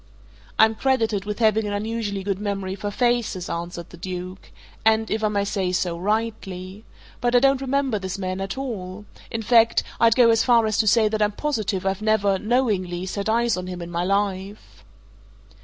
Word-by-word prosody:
"I'm 220 0 +5
credited 225 -5 0
with 210 0 -4
having 220 -2 +2
an 205 - -3
unusually 205 -1 -3
good 195 -1 -2
memory 195 -2 -3
for 205 +1 -4
faces," 235 -5 0
answered 170 0 -5
the 175 - -11
Duke. 185 +1 -7 0.3
"And 220 0 +2
if 220 0 -1
I - - +4
may 205 -1 0
say 195 -3 -1
so 180 -1 -1
rightly. 200 -1 -3 0.4
But 245 0 +1
I - - +8
don't 270 +1 +3
remember 270 -4 0
this 190 0 -4
man 185 0 -3
at 195 +5 -4
all 210 -7 -5 0.2
in 225 0 -4
fact, 230 0 +4 0.2
I'd 230 -1 +5
go 240 -2 +6
as 225 - +3
far 235 -3 +4
as 215 -1 0
to 220 - +2
say 220 +1 +5
that 215 0 -2
I'm 210 0 +2
positive 215 -8 -2
I've 195 +1 -1
never 205 -3 +2
knowingly 200 -7 0
set 200 +2 -3
eyes 235 +1 +2
on 180 0 -5
him 180 -1 -6
in 170 0 -7
my 170 0 -1
life." 195 +1 -2
210 Hz, 190 wpm, -23 LUFS, 190-225 Hz, 0.4 s, I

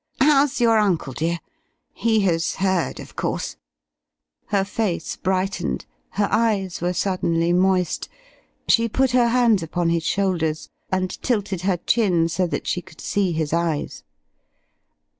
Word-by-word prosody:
How's 285 -1 +4
your 230 -2 +4
uncle, 175 -10 0
dear? 165 +5 -1 0.6
He 220 -2 +2
has 165 -4 +1
heard, 190 -7 0
of - - -11
course?" - - -3 0.9
Her 200 -2 +1
face 200 -5 -2
brightened, 190 +1 -1 0.3
her 205 - +1
eyes 210 -6 +1
were 175 +1 +1
suddenly 170 -2 0
moist. 180 -1 +1 0.6
She 230 0 +4
put 265 +3 +1
her 245 -1 +4
hands 235 -4 +3
upon 165 +1 -1
his 170 0 +1
shoulders 170 -5 -1 0.2
and 185 -1 -2
tilted 205 -7 -1
her 185 -1 +1
chin 175 -4 +2
so 180 +2 0
that - - -3
she 175 - -1
could 160 - -17
see 195 -3 0
his 155 -2 -2
eyes. 170 -3 -1
185 Hz, 140 wpm, -22 LUFS, 170-215 Hz, 0.9 s, How's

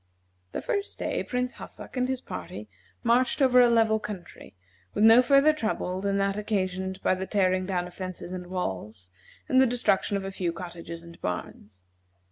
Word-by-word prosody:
The - - -4
first 405 -1 -2
day - - -2
Prince 250 0 -2
Hassak - - -10
and 250 0 +1
his 260 -1 -2
party 105 - -7 0.4
marched 240 +4 +3
over 255 -2 +6
a 245 - +6
level 225 -2 +3
country, 180 - -9 0.4
with - - +2
no 225 +2 +9
further 275 +4 +5
trouble 215 -8 -2
than 200 0 0
that 195 0 0
occasioned 190 -2 -2
by - - +3
the 190 +1 -3
tearing 185 -2 +1
down 180 -2 -1
of 180 - -10
fences 185 -1 -6
and 180 -1 -6
walls, 105 - -5 0.4
and 260 0 +5
the 265 - +5
destruction 230 -4 +1
of 195 - -5
a 195 - -4
few 180 -3 -2
cottages 170 -1 -8
and 170 0 -14
barns. 90 +1 -6
195 Hz, 180 wpm, -27 LUFS, 180-235 Hz, 0.4 s, no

